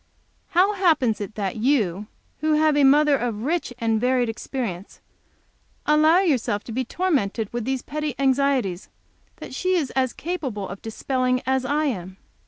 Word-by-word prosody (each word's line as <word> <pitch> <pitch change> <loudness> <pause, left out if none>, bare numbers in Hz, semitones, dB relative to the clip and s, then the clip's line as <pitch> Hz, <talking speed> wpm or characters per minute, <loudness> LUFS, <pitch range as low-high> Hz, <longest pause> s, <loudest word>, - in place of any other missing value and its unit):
How 390 +4 +5
happens 315 - +2
it 205 +1 -6
that 200 -2 -3
you, 215 -6 +1 0.3
who 310 +1 +1
have 305 0 +3
a 290 - +4
mother 290 +2 +5
of 230 -4 -3
rich 320 0 -1
and 225 -2 0
varied 250 -1 +2
experience, 225 -5 -5 0.9
allow 310 +4 +5
yourself 250 - 0
to - - -9
be 255 +3 -1
tormented 235 - -1
with 240 -2 -3
these 265 0 -2
petty 300 -2 -4
anxieties 265 -8 +1 0.5
which - - -9
she 370 0 0
is 300 -8 0
as 260 -2 0
capable 265 - -4
of 195 - -8
dispelling 255 +3 -1
as 265 0 0
I 295 +3 +1
am?" 190 -8 -4
260 Hz, 160 wpm, -23 LUFS, 220-300 Hz, 0.9 s, How